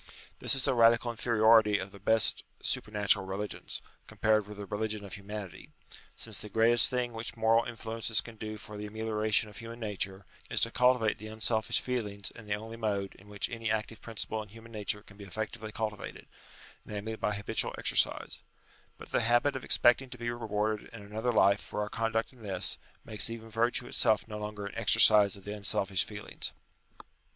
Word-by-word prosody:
This - - +3
is 135 +1 +1
a 135 - +3
radical 115 0 +5
inferiority 110 -2 +4
of 100 0 -5
the 100 - -13
best 110 +3 +3 0.2
supernatural 105 -2 +1
religions, 95 +2 -4 0.2
compared 110 -1 +1
with 105 -1 -9
the 100 - -6
Eeligion 105 +1 -3
of 100 - -9
Humanity; 100 -2 -7 0.5
since 110 -4 -4
the 105 - -8
greatest 115 +3 +6
thing 125 -1 -1
which 115 +1 -6
moral 115 +1 +4
influences 115 -2 -1
can 115 +3 -7
do 110 0 -6
for 105 0 -9
the 105 0 -5
ameliora 110 0 -2
tion 105 +1 +3
of 105 - -14
human 115 +1 -8
nature, 100 -3 -3 0.2
is - - +2
to 115 - +3
cultivate 125 -3 +3
the 110 - -7
unselfish 110 0 0
feelings 105 -6 -3
in 115 -2 -13
the 105 - 0
only 110 +2 -8
mode 100 -3 -1
in 100 - -18
which 105 -1 -2
any 115 -1 -3
active 110 0 -2
principle 110 -1 -3
in 105 - -10
human 115 +2 -13
nature 105 -1 -2
can 100 - -17
be 105 - -10
effectually 110 +2 -5
cultivated, 105 -1 -5 0.6
namely 105 +2 -5
by 105 -1 -1
habitual 100 0 -1
exercise: - - 0 0.6
but - - -11
the - - +2
habit 120 +5 +3
of 130 - -4
expecting 130 +2 +4
ta 125 - -8
be 120 0 -2
rewarded 110 -2 -2
in 115 -3 -10
another 110 +4 -2
life 100 -2 +4
for - - -5
our 105 0 -1
conduct 115 +2 -1
in 125 - -18
this, 95 -4 0 0.3
makes 110 -1 +2
even 115 -1 -8
virtue 120 +2 +1
itself 110 -2 +3
no 105 -1 -6
longer 105 -1 -5
an 100 - -6
exercise 105 -2 +6
of 100 - -15
the 105 - -5
unselfish 100 -2 0
feelings. 105 -1 -5
110 Hz, 190 wpm, -31 LUFS, 105-115 Hz, 0.6 s, greatest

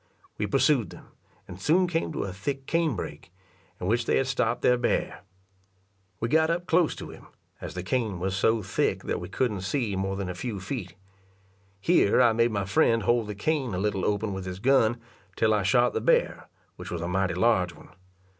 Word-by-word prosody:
We 105 - 0
pursued 130 +1 +2
them, - - -14 0.4
and 90 +1 -10
soon 175 - +3
came 165 -2 -1
to - - -2
a 95 - -5
thick 135 +8 -4
cane 165 -5 +1
brake, 85 -3 -7 0.5
in - - -5
which 115 +4 0
they - - +3
had 135 - +1
stop'd 125 -3 -1
their 125 - +5
bear. 120 -1 -1 1.0
We 115 - -1
got 160 +5 +3
up 175 +1 -1
close 170 -2 +2
to - - -8
him, - - -14 0.3
as - - -7
the 90 - -4
cane 110 -3 -1
was 95 +1 -2
so 110 +3 +2
thick - - -1
that - - -2
we - - -7
couldn't 110 -7 -1
see 105 +1 -1
more 95 0 -2
than 100 -1 -4
a 90 - -3
few 105 +2 -5
feet. 95 -3 -6 0.8
Here 100 +2 +3
I 120 -3 +5
made 115 +1 +3
my 100 -3 -2
friend 115 +3 +2
hold 120 -1 +2
the 105 - -5
cane 130 - -1
a - - -2
little 100 0 -1
open 105 0 0
with 95 -1 -5
his 90 -1 -5
gun 120 0 +3 0.4
till 110 -1 +2
I 105 - +2
shot 120 +4 +3
the - - -1
bear, - - +1 0.3
which - - -8
was 85 -2 -4
a - - -2
mighty 95 -1 0
large 90 -3 +2
one. - - -16
110 Hz, 210 wpm, -27 LUFS, 95-125 Hz, 1.0 s, their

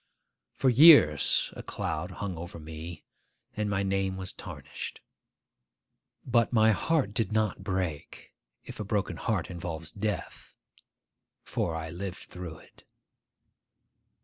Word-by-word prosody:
For 135 - +3
years 120 - +7
a - - -6
cloud 80 +4 -3
hung 95 0 -5
over 85 +1 -7
me, 80 +1 -8 0.5
and 105 -1 -1
my 100 -1 0
name 95 -1 0
was 95 -1 -5
tarnished. - - -7 1.3
But 120 -2 +3
my 110 -2 +5
heart 130 - +1
did 110 -3 0
not 110 -3 0
break, 95 -6 -4 0.3
if - - -9
a - - -2
broken 105 -1 -1
heart 105 -6 -1
involves 85 -2 -5
death; 105 0 -4 0.9
for 80 - -2
I 80 0 -5
lived 90 +2 -7
through 90 -3 -7
it. - - -20
95 Hz, 120 wpm, -29 LUFS, 85-110 Hz, 1.3 s, years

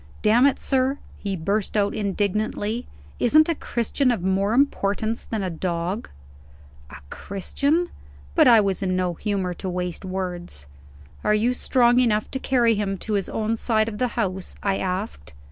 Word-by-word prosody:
"Damn 235 +5 +5
it, 280 - +1
sir," 265 +1 +1 0.2
he 200 -2 -2
burst 200 +5 -1
out 205 -1 +2
indignantly, 210 +3 -1 0.3
"isn't 310 +6 +5
a 335 - +2
Christian 250 -1 0
of 230 -8 0
more 195 +3 +1
importance 225 -4 +1
than 220 -3 -3
a 185 - -2
dog?" 175 +5 -3 0.8
A 70 - -10 0.2
Christian! 285 - -1 0.5
but - - +5
I 230 -3 +8
was 195 -2 -1
in 185 -1 0
no 180 -1 0
humor 190 0 -2
to 190 +2 -5
waste 180 0 -3
words. 180 - -4 0.6
"Are 210 - +3
you 230 +4 +2
strong 245 -1 +3
enough 215 -4 +1
to 265 - -2
carry 240 -4 +3
him 200 -2 -1
to 215 - -4
his 200 -2 0
own 220 +1 -1
side 220 -1 +1
of 210 -2 -5
the 250 - +2
house?" 190 -4 -2
I 195 -1 +1
asked. 180 - -4
210 Hz, 165 wpm, -24 LUFS, 190-235 Hz, 0.8 s, I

